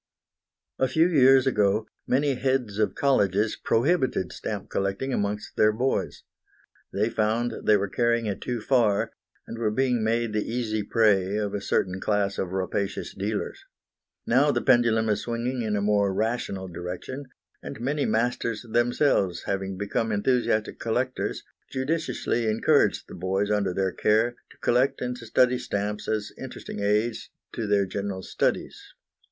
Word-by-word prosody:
A 130 - +3
few 160 +5 +3
years 135 -5 +5
ago 105 -4 +2 0.2
many 140 +2 +2
heads 125 -5 -1
of 105 - +1
colleges 105 -6 +2
prohibited 130 - +1
stamp 105 -2 -5
collecting 100 +7 -1
amongst 105 -1 -2
their 110 0 +5
boys. 125 +5 -1 0.7
They 105 +2 +1
found 115 +2 0
they 105 - +6
were 100 0 -1
carrying 120 +2 +1
it 100 -2 -3
too 120 -2 -3
far, 110 -5 +2 0.3
and 115 - -7
were 110 -2 +1
being 125 +1 +1
made 115 0 0
the 105 -1 0
easy 115 -3 -1
prey 100 -3 +2
of 105 -1 -1
a 100 - -2
certain 95 -1 -1
class 100 -2 0
of 90 - -2
rapacious 95 +1 -2
dealers. - - -3 0.6
Now 135 +5 +4
the - - 0
pendulum 115 -3 +4
is 105 -1 +1
swinging 120 +2 -2
in 110 -2 -1
a 100 - 0
more 100 -1 +2
rational 100 -2 -2
direction, 90 - -6 0.4
and - - -8
many 140 +4 -1
masters 115 0 0
themselves 120 - +1
having 95 -1 -3
become 105 +3 -1
enthusiastic 110 0 0
collectors, 125 +3 -2 0.3
judiciously 130 -4 -1
encourage 110 +1 +2
the - - -12
boys 95 +3 -1
under 100 -3 +1
their 95 +1 0
care 110 +6 +2 0.2
to - - -19
collect 130 +3 +2
and 125 0 -3
study 125 +2 +2
stamps 105 -2 -3
as 105 -1 -2
interesting - - -7
aids 105 +3 0 0.2
to 110 - -3
their 100 -1 +3
general 100 0 -4
studies. - - -1
110 Hz, 150 wpm, -26 LUFS, 100-125 Hz, 0.7 s, they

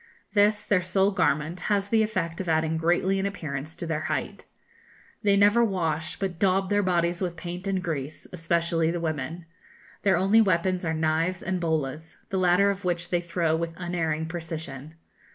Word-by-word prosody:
This, 210 0 +3
their 200 -3 +3
sole 190 +2 +2
garment, 165 -3 0
has 200 -1 +1
the 225 0 +4
effect 185 -6 -1
of 180 - -4
adding 160 0 +1
greatly 175 +4 +1
in 195 - 0
appearance 155 -5 -5
to - - -6
their 160 -2 -1
height. - - -3 0.8
They 200 -2 +3
never 205 +4 +5
wash, 160 -7 -1
but 190 -4 -3
daub 195 0 +2
their 205 0 +3
bodies 175 -1 +1
with 175 -2 -2
paint 180 +2 -6
and 190 -2 -1
grease, 155 -3 -4
especially 165 -1 +1
the 170 +1 -1
women. 160 +1 -3 0.6
Their 190 -3 +3
only 195 +5 +5
weapons 185 -2 +1
are 160 0 0
knives 160 +3 0
and 185 0 -1
bolas, 160 -1 -2
the 190 - -1
latter 185 +2 +4
of 200 0 -6
which 175 -1 -2
they 175 -1 +2
throw 170 -2 0
with 165 0 -3
unerring 165 -3 -1
precision. 160 -3 -6
175 Hz, 175 wpm, -26 LUFS, 160-190 Hz, 0.8 s, never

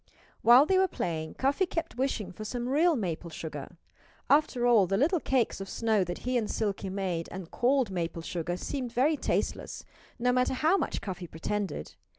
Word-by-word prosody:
While 245 +5 +8
they 375 +3 +3
were 380 - +4
playing 160 - -3
Cuffy 280 +8 +1
kept 330 -4 -3
wishing 245 -7 -1
for 215 - -8
some 240 +3 -3
real 315 +5 +3
maple 175 - -3
sugar. 155 0 -7 0.5
After 285 -4 +3
all, 225 -6 +5
the 195 - +1
little 325 - +3
cakes 255 -8 0
of 195 - -6
snow 220 -4 +1
that 175 0 -4
he 250 0 +2
and 215 - -3
Silkie 200 -3 -2
made 185 -4 -2
and 185 -2 -7
called 250 -3 +2
maple 170 -2 -3
sugar 175 +1 -3
seemed 250 +5 -4
very 280 +6 +3
tasteless, - - -2 0.3
no 250 0 +2
matter 250 +1 +2
how 315 +8 +3
much - - -1
Cuffy 185 -3 -5
pretended. 195 +5 -4
225 Hz, 180 wpm, -29 LUFS, 180-265 Hz, 0.5 s, While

